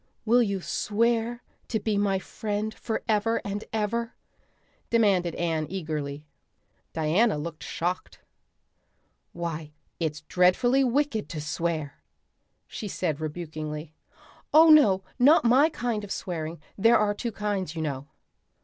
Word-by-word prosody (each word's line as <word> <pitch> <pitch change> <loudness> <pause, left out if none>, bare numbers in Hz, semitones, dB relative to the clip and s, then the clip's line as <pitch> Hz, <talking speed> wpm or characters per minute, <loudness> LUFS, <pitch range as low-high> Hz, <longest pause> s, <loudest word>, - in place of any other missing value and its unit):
"Will 240 +2 +5
you 200 -4 0
swear 230 +4 0 0.2
to 220 - -1
be 215 0 -1
my 200 -1 +2
friend 210 +2 -3
forever 225 0 -1
and 205 +1 -3
ever?" 225 +2 -2 0.7
demanded 195 -7 +2
Anne 160 -3 -1
eagerly. 150 -5 -4 0.7
Diana 165 +6 +2
looked 155 +1 -6
shocked. 180 +2 -3 1.1
"Why 165 -3 -5 0.3
it's 155 -3 -2
dreadfully 185 +11 +3
wicked 260 -3 0
to 160 - -5
swear," 155 -1 -3 0.6
she 215 - -6
said 160 -6 -2
rebukingly. 155 -1 -5 0.6
"Oh 320 +1 +8
no, 200 -12 +6 0.2
not 280 +3 +6
my 265 +7 +5
kind 240 -8 -2
of 200 - -8
swearing. 165 -2 -4 0.2
There 230 +4 +6
are 210 -1 +2
two 235 +3 -4
kinds, 200 -6 -3
you 160 - -2
know." 140 -2 -4
195 Hz, 120 wpm, -27 LUFS, 160-230 Hz, 1.1 s, Oh